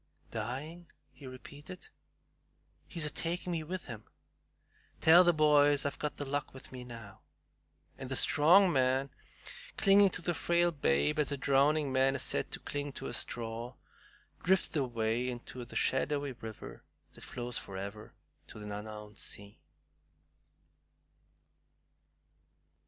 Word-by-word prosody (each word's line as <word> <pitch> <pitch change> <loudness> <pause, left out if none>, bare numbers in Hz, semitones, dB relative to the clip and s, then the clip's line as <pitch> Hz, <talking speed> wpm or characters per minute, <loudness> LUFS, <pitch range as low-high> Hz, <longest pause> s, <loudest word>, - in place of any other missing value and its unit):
"Dying!" 135 +10 -5 0.2
he 140 - -12
repeated; 145 +7 -11 1.0
"he's 165 -3 -1
a 150 - -1
taking 175 +2 -2
me 165 -2 -1
with 180 +4 -6
him. 110 -2 -8 0.9
Tell 170 +3 +8
the 175 - +5
boys 145 -3 +4
I've 145 - -3
got 150 - -3
The 145 - -4
Luck 140 0 -3
with 130 - -11
me 130 -1 -8
now;" 115 -5 -11 0.8
and 130 -1 -6
the 130 - -2
strong 175 +8 +5
man, 130 0 +1 0.7
clinging 195 0 +6
to 180 - -4
the 175 - 0
frail 170 +2 +2
babe 140 - +1
as 150 -1 +1
a 140 - -1
drowning 140 +2 +2
man 135 +1 +3
is 135 - 0
said - - 0
to - - -4
cling 145 -1 -4
to - - -8
a - - -6
straw, 115 +1 -3 0.7
drifted 190 -1 +2
away 120 -1 -1
into 125 0 -7
the 120 - -12
shadowy 140 +1 0
river 110 -3 -9 0.3
that - - -14
flows 120 0 -4
forever 100 +2 -8 0.3
to - - -11
the 105 -1 -6
unknown 105 0 -8
sea. 100 +1 -7
135 Hz, 135 wpm, -32 LUFS, 120-155 Hz, 1.0 s, Tell